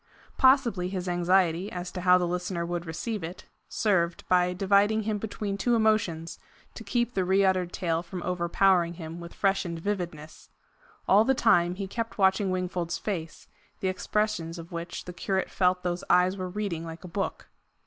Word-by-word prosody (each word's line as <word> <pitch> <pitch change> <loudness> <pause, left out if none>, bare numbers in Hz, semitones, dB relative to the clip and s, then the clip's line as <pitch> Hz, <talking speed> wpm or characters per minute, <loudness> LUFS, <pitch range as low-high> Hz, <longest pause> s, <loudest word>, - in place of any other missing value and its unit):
Possibly 250 -9 +3
his 185 -1 -4
anxiety 175 +1 +2
as 180 0 -5
to 180 - -5
how 180 0 +6
the 180 - 0
listener 175 0 -2
would 175 0 -4
receive 205 +5 -4
it, 175 +3 -7 0.2
served, 175 -5 0
by 180 0 +3
dividing 200 +4 +2
him 210 -1 -1
between 205 -1 -4
two 240 +4 +2
emotions, 205 -8 +1 0.3
to - - -9
keep 240 +3 -1
the 190 - +1
reuttered 190 -1 +2
tale 165 -3 -1
from 180 +1 -7
overpowering 175 0 +2
him 165 0 -7
with 170 0 -10
freshened 195 -4 0
vividness. 165 -4 -5 0.6
All 200 +3 +6
the 265 +3 +2
time, 175 -7 +3
he 195 +1 -4
kept 230 +3 -4
watching 190 0 +3
Wingfold's 180 -2 -2
face, 165 -6 -5 0.3
the 190 - 0
expressions 185 -3 -1
of 165 0 -10
which 170 +1 -6
the 180 - -7
curate 190 +1 -2
felt 180 -1 +1
those 180 0 -2
eyes 180 +1 +4
were 185 -2 -4
reading 185 -4 -3
like 165 +1 -8
a - - -7
book. 195 +3 -4
180 Hz, 170 wpm, -27 LUFS, 175-200 Hz, 0.6 s, how